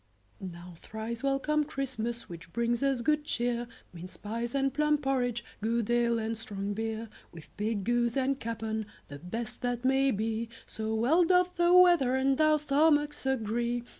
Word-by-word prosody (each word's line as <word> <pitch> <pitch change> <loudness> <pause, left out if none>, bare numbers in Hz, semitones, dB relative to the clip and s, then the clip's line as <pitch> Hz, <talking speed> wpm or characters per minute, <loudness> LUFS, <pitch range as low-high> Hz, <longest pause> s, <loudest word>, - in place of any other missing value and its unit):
Now 175 -1 -8
thrice 220 +5 -6
welcome, 275 +2 +1
Christmas, 250 -5 -4
Which 170 0 -10
brings 235 +4 0
us 275 -3 +1
good 300 +4 +1
cheer, 240 -3 -1 0.3
Minced 180 +1 -11
pies 230 +4 -3
and 270 -1 +1
plum 300 +1 +2
porridge, 250 -4 -1 0.2
Good 230 +1 0
ale 235 -1 +2
and 225 0 -2
strong 205 -2 -4
beer; 225 +1 -3 0.2
With 165 -2 -14
pig, 210 -1 -2
goose, 240 +2 +1
and 270 +1 +1
capon, 220 -1 -3 0.2
The 145 0 -8
best 220 +10 -5
that 245 -1 -2
may 270 +1 +3
be, 225 0 -1 0.2
So 220 0 -3
well 275 +11 +4
doth 360 +1 +3
the 345 0 +3
weather 350 -8 +6
And 270 +2 +2
our 310 0 +5
stomachs 295 -1 +2
agree. 240 -1 -1
240 Hz, 165 wpm, -30 LUFS, 220-275 Hz, 0.3 s, weather